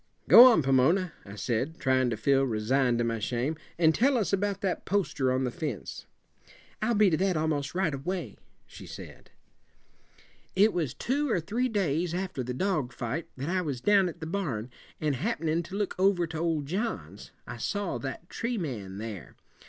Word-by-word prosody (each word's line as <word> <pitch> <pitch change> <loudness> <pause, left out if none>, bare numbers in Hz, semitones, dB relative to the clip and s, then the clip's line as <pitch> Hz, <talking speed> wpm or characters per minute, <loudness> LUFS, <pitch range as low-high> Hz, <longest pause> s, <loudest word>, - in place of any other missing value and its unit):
"Go 240 - +11
on, 165 - +3
Pomona," 150 +7 +3
I 100 - -9
said, 125 +9 -2
trying 130 -2 +2
to 110 - -2
feel 135 +2 +3
resigned 125 +1 +1
to 120 - +1
my 115 -1 -1
shame, 125 +7 -1 0.2
"and 160 -2 +4
tell 260 - +3
us 210 -3 -1
about 200 0 0
that 190 -3 -1
poster 175 -10 0
on 130 +1 +1
the 125 - -1
fence." 150 - -5 0.7
"I'll 235 - +1
be 205 -3 +4
to 155 - +2
that 185 -1 +1
almost 155 -1 -1
right 180 -5 +1
away," 175 +7 -4 0.3
she - - -12
said. - - -11 1.3
"It 205 +3 +5
was 160 -8 -2
two 285 +3 -1
or 205 - +2
three 230 +10 -1
days 175 - 0
after 185 -6 -3
the 125 0 -4
dog 150 -2 -1
fight 135 +7 -4
that 135 +5 -4
I 185 0 +1
was 145 -7 -3
down 195 +4 +4
at 165 - -11
the - - -4
barn, 150 - -3 0.3
and 150 -3 0
happenin' 165 - -1
to 185 - -8
look 205 -1 -1
over 190 -2 +3
to 160 -1 -6
old 160 -3 0
John's, 135 - -4 0.2
I - - -7
saw 205 - -2
that 140 +5 -6
tree 235 +4 -3
man 110 - -5
there. 105 -3 -7
160 Hz, 185 wpm, -28 LUFS, 130-195 Hz, 1.3 s, Go